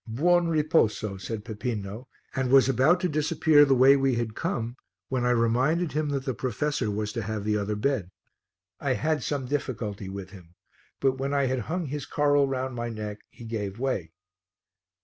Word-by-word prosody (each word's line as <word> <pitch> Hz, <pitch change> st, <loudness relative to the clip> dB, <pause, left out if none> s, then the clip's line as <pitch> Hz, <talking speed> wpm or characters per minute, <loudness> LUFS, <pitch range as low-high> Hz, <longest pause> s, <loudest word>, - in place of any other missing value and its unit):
"Buon 170 Hz, +9 st, +3 dB
riposo," 150 Hz, -11 st, +1 dB
said 110 Hz, -1 st, -5 dB
Peppino, 110 Hz, +1 st, -5 dB, 0.3 s
and 130 Hz, -1 st, -1 dB
was 135 Hz, -1 st, +6 dB
about 135 Hz, +7 st, +4 dB
to 180 Hz, -, +2 dB
disappear 150 Hz, -1 st, +4 dB
the 135 Hz, -1 st, +3 dB
way 130 Hz, +2 st, +7 dB
we 135 Hz, -2 st, +2 dB
had 115 Hz, -2 st, -2 dB
come 115 Hz, +2 st, -3 dB, 0.3 s
when 130 Hz, -2 st, -1 dB
I 125 Hz, -, +2 dB
reminded 125 Hz, +8 st, +2 dB
him 150 Hz, +2 st, -1 dB
that 135 Hz, -2 st, -2 dB
the 130 Hz, -, -1 dB
professor 130 Hz, +1 st, -1 dB
was 105 Hz, 0 st, -2 dB
to 115 Hz, -, -2 dB
have 110 Hz, 0 st, -4 dB
the 105 Hz, 0 st, 0 dB
other 105 Hz, 0 st, -1 dB
bed. 105 Hz, -4 st, -1 dB, 0.7 s
I 135 Hz, -2 st, 0 dB
had 155 Hz, +2 st, 0 dB
some 140 Hz, 0 st, -2 dB
difficulty 110 Hz, -8 st, -3 dB
with 95 Hz, -1 st, -7 dB
him, 90 Hz, -3 st, -15 dB, 0.4 s
but 135 Hz, -1 st, +1 dB
when 140 Hz, +1 st, -1 dB
I 140 Hz, -1 st, +2 dB
had 130 Hz, 0 st, 0 dB
hung 175 Hz, +1 st, -1 dB
his 145 Hz, +1 st, -5 dB
coral 145 Hz, -1 st, +3 dB
round 130 Hz, -1 st, -2 dB
my 120 Hz, 0 st, -3 dB
neck 105 Hz, -2 st, -5 dB
he 120 Hz, -, -12 dB
gave 105 Hz, -3 st, -4 dB
way. 115 Hz, -11 st, -2 dB
130 Hz, 185 wpm, -27 LUFS, 110-140 Hz, 0.7 s, way